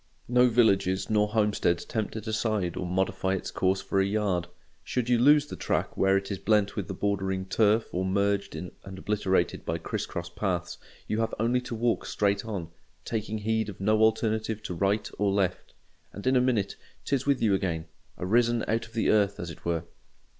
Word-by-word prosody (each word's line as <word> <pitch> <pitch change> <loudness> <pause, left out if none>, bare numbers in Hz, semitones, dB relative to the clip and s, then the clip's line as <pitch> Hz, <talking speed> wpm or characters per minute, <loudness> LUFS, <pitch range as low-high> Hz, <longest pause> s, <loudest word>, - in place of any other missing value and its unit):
No 125 +1 +5
villages 100 -5 +2
nor 105 -1 +3
homesteads 105 -5 +1
tempt 110 -2 -3
it 110 - -5
aside 110 -5 -1
or 90 - -3
modify 95 +1 0
its 95 - -5
course 95 +1 +1
for 95 - 0
a - - +2
yard; 100 -4 0 0.4
should 125 -1 -2
you 120 -1 +4
lose 145 +3 +6
the - - -7
track - - -1
where 95 0 +3
it 100 +1 -4
is 95 - -3
blent 105 -1 +2
with 100 -5 -3
the 95 - -5
bordering 95 -1 -1
turf 110 +3 +2
or 90 - 0
merged 100 +1 0
in 90 - -6
and 95 -1 -9
obliterated 95 -3 0
by - - -2
criss - - -4
cross 85 0 -5
paths, 85 0 -3 0.3
you 110 - -1
have 115 0 -1
only 120 +3 +2
to 125 -1 -5
walk 115 +1 0
straight 100 -1 +1
on, 100 -7 -5 0.4
taking 110 -1 -2
heed 110 0 0
of 100 - -9
no 110 +2 +2
alternative 110 0 +1
to 90 - -4
right 100 +4 0
or 100 -1 +2
left; 95 -2 -1 0.4
and 100 - -8
in 130 +1 +3
a 125 - +5
minute 120 -6 0 0.3
'tis 140 -1 0
with 140 -2 +3
you 105 -3 +3
again—arisen 95 +6 -1
out 115 +1 0
of 115 - -21
the 115 - +2
earth 100 -2 +2
as 85 -1 -5
it 80 - -13
were. 85 -1 0
105 Hz, 195 wpm, -28 LUFS, 95-110 Hz, 0.4 s, lose